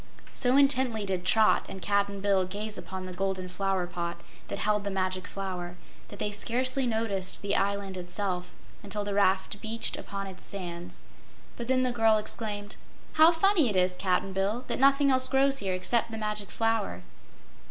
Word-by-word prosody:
So 250 +1 +4
intently 260 -6 +3
did 185 -2 -2
Trot 220 +3 +4
and 190 - -7
Cap'n 200 +1 0
Bill 195 -2 +3
gaze 205 +3 -4
upon 190 -1 -6
the 185 - -7
Golden 190 0 -2
Flower 190 0 -1
pot 170 -1 -4 0.3
that - - -4
held 210 -1 0
the 200 - -2
Magic 185 -1 -2
Flower 180 -3 -5 0.3
that 205 - -10
they 210 0 -2
scarcely 255 +5 0
noticed 220 -6 -2
the 200 0 0
island 200 -1 -1
itself 180 0 -3 0.3
until 205 +1 -4
the 205 0 -3
raft 195 0 +1
beached 225 +1 -2
upon 195 0 -5
its 190 -1 -9
sands. 175 -3 -6 0.5
But 235 - -6
then 255 0 +3
the 255 - +1
girl 225 -2 +4
exclaimed: 210 -1 -4 0.4
"How 315 +2 +7
funny 335 - +3
it 205 - -2
is, 180 0 +3
Cap'n 185 +1 0
Bill, 205 +6 -1
that - - -1
nothing 275 +1 +5
else 260 0 +7
grows 275 0 +3
here 190 -4 -1
excep' 225 +6 0
the 225 -1 -6
Magic 210 -2 -4
Flower." 225 - -1
200 Hz, 175 wpm, -28 LUFS, 190-230 Hz, 0.5 s, How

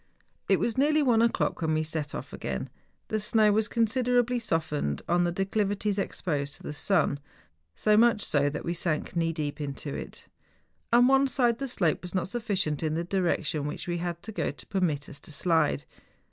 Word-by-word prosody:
It - - +4
was 235 +1 0
nearly 300 +2 +4
one 235 -4 +4
o'clock 235 -5 +1
when 160 -1 +1
we 155 - +1
set 155 -2 -4
off - - -7
again. 65 0 -4 0.4
The 215 - 0
snow 215 0 +3
was 215 +1 +2
considerably 245 +1 +1
softened 155 - -1
on 175 +1 +3
the 175 - 0
declivi¬ 195 +2 0
ties 205 0 0
exposed 145 -7 -2
to - - -13
the - - -5
sun, 150 -2 +1 0.6
so 210 - +3
much 225 -1 +4
so 145 -1 +2
that 145 - -5
we 170 - -1
sank 170 -1 -1
knee 165 -1 +1
deep 150 -2 -4
into 140 0 -5
it. - - -8 0.6
On 240 +1 +6
one 270 +1 +5
side 240 -3 +1
the 275 - -2
slope 175 - 0
was 180 +1 -7
not 185 0 0
sufficient 200 - -1
in 155 -1 -1
the 170 - -1
direction 170 -5 0
which 150 - -6
we 175 -1 -1
had 170 -1 -4
to 220 - -6
go - - -1
to - - -9
permit 160 -7 -1
us 140 - -10
to - - -13
slide. 160 - +1
180 Hz, 200 wpm, -28 LUFS, 155-225 Hz, 0.6 s, On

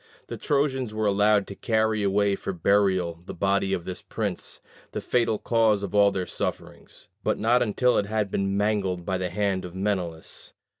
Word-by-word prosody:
The - - -5
Trojans 135 -6 0
were 110 0 0
allowed 105 0 +3
to - - -8
carry 110 -1 +1
away 100 0 +2
for 100 - -4
burial 95 -2 +2
the - - -8
body 100 +1 +1
of 90 -3 -2
this 90 - -6
prince, - - -4 0.3
the - - -2
fatal 115 -3 +1
cause 110 -3 +2
of 100 - -5
all 100 -1 +6
their 95 -2 -2
sufferings; - - -6 0.2
but - - +1
not 120 +3 +3
until 125 +3 +2
it 100 - -2
had 105 -2 -1
been 100 0 0
mangled 100 -4 0
by 95 -1 -1
the 90 -1 -2
hand 100 0 -1
of 90 0 -8
Menelaus. 95 -5 -3
100 Hz, 185 wpm, -26 LUFS, 95-110 Hz, 0.3 s, all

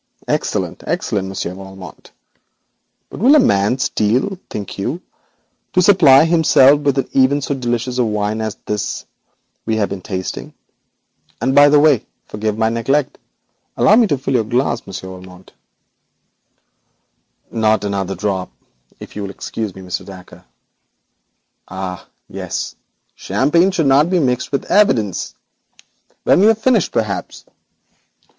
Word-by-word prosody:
Excellent! - - -2
excellent! 95 -2 -2
Monsieur 95 -2 -4
Valmont. 95 -1 -12 1.0
But - - -8
will 260 +9 +5
a - - +7
man 100 - +2
steal, 135 - 0
think 100 -1 -7
you, 120 +7 -1
even 175 - -10 0.7
to 185 - +4
supply 160 -7 +6
himself 150 -4 +5
with 145 -2 0 0.5
so 140 - -1
delicious 125 -1 -2
a - - +4
wine 105 0 -2
as 110 -1 -3
this 105 -1 -3 0.6
we 110 - +1
have 105 -2 0
been 100 - -6
tasting? 95 0 -6 0.8
And, 130 +4 0
by 145 +1 +7
the 145 0 +5
way, 145 -6 +4 0.2
forgive 105 0 -3
my 110 0 +2
neglect, 130 +5 -1 0.6
allow 210 - +5
me 230 -1 +4
to 145 - 0
fill 135 +1 -3
your 120 -3 +2
glass, 120 +2 -1
Monsieur 95 -1 -7
Valmont.' 90 0 -13 2.0
'Not 110 -2 +1
another 100 -1 -2
drop, 95 -3 -3 0.5
if - - -11
you 105 - -5
will 100 - -5
excuse 105 0 -6
me, 95 - -10
Mr. 90 0 -4
Dacre.' 95 -2 -13 1.2
'Ah, 95 -1 -6 0.2
yes, - - -5 0.4
champagne 170 +7 +1
should 175 -5 0
not 140 +4 +4
be 185 - +2
mixed 125 -6 0
with 140 - -2
evidence. 115 - +1 0.9
When - - +4
we 205 - +5
have 225 -1 +4
finished, 225 -4 +1
perhaps. 105 -4 -3
115 Hz, 135 wpm, -18 LUFS, 100-145 Hz, 2.0 s, a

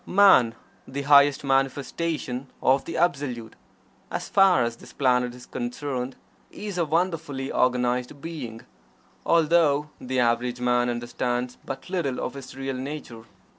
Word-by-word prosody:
Man, 180 - +6 0.3
the 140 +2 -4
highest 140 0 +5
manifestation 135 0 -1
of 135 +1 +3
the 165 - -4
Absolute, 135 -9 -1 0.5
as - - -4
far 195 -10 +5
as 115 0 -2
this - - -14
planet 125 -2 +1
is 125 - -12
concerned, 125 +1 -4 0.3
is 205 -4 -6
a 170 - +2
wonderfully 160 -5 -1
organized 125 +1 +1
being 135 -8 -7 0.7
although 155 -3 +3
the 130 0 -2
average 120 +1 +1
man 125 0 +2
understands 120 +1 -2
but 135 - -6
little 170 -9 -1
of - - -3
his 135 -2 -9
real 135 0 -3
nature. 130 -4 -7
135 Hz, 130 wpm, -25 LUFS, 125-150 Hz, 0.7 s, Man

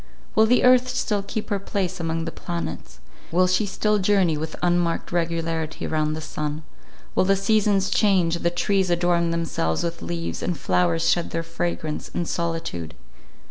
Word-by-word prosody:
Will 220 - +5
the 245 +2 +4
earth 255 0 +6
still 215 -4 0
keep 210 +2 -5
her 200 - +1
place 190 -2 -2
among 165 0 -2
the 165 - -3
planets; 170 - -6 0.3
will 180 +2 +4
she 185 +3 +1
still 210 +2 +1
journey 190 -4 +3
with 155 +1 -4
unmarked 175 -1 +1
regularity 165 -2 -2
round 155 -1 0
the 160 - -5
sun; 150 0 -4 0.5
will - - +3
the 195 +1 +4
seasons 200 -1 +2
change, 180 -5 +3
the 170 - +1
trees 190 +2 +1
adorn 175 0 +2
themselves 165 - -1
with 170 0 -3
leaves, 170 -1 -4
and 175 -3 -1
flowers 90 -7 +1
shed 175 - +2
their 165 0 -2
fragrance, 165 -2 -3
in 175 - 0
solitude? 165 - -3
170 Hz, 165 wpm, -24 LUFS, 165-195 Hz, 0.5 s, earth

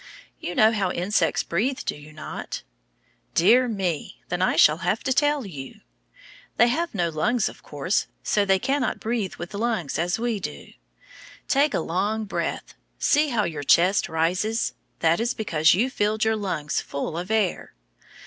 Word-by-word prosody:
You 175 - -5
know 220 +1 +6
how 200 -4 0
insects 180 -1 +1
breathe 240 +10 -1
do - - -1
you 150 +1 -13
not? 155 0 -7 0.7
Dear 235 +9 +5
me, 190 -8 -3
then 180 0 -2
I 185 - +2
shall 155 0 +5
have 180 +5 -1
to 265 - +1
tell 290 -1 +2
you. 140 -8 -9 0.8
They 240 - +5
have 330 +2 -1
no 175 -3 +1
lungs; 190 +9 +1
of - - -9
course, 150 +7 -1 0.2
so 205 - +2
they 195 -1 +3
cannot 270 +6 -1
breathe 220 -4 -2
with 175 - -8
lungs 210 -8 -1
as 175 +1 0
we 230 -2 -1
do. 70 - -7 0.8
Take 285 +2 +2
a - - +1
long 210 +6 -1
breath 200 - -3 0.2
see 300 +1 +3
how 235 -6 +1
your 155 -6 -3
chest 180 +7 +3
rises 180 +8 0 0.3
that 165 +1 +3
is 235 +2 0
because 160 -8 +3
you 225 +7 +2
filled 215 -1 0
your 220 0 +2
lungs 180 -8 -2
full 140 +3 -4
of 175 +3 -4
air. 215 - 0
200 Hz, 170 wpm, -24 LUFS, 170-230 Hz, 0.8 s, know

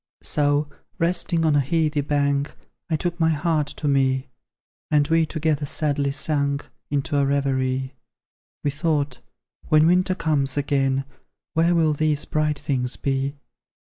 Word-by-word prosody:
So, 145 0 +1 0.3
resting 170 -1 +1
on 155 -2 +3
a - - +5
heathy 150 +1 +1
bank, 140 0 0 0.3
I 160 - +2
took 175 +2 -3
my 160 -1 +3
heart 155 -1 +1
to 150 - -4
me; 135 -1 +1 0.6
And 145 -1 +3
we 165 -1 +3
together 155 -2 -1
sadly 145 -1 0
sank 140 -1 -1 0.2
Into 145 0 -1
a 140 - +3
reverie. 130 -2 0 0.7
We 145 - +1
thought, 145 -3 -1 0.5
"When 155 0 +5
winter 185 +2 +3
comes 145 -6 0
again, 135 -1 +1 0.5
Where 170 +2 +3
will 160 -2 +3
these 150 0 0
bright 150 -1 0
things 125 -3 -1
be? 135 +1 -1
145 Hz, 140 wpm, -23 LUFS, 140-155 Hz, 0.7 s, a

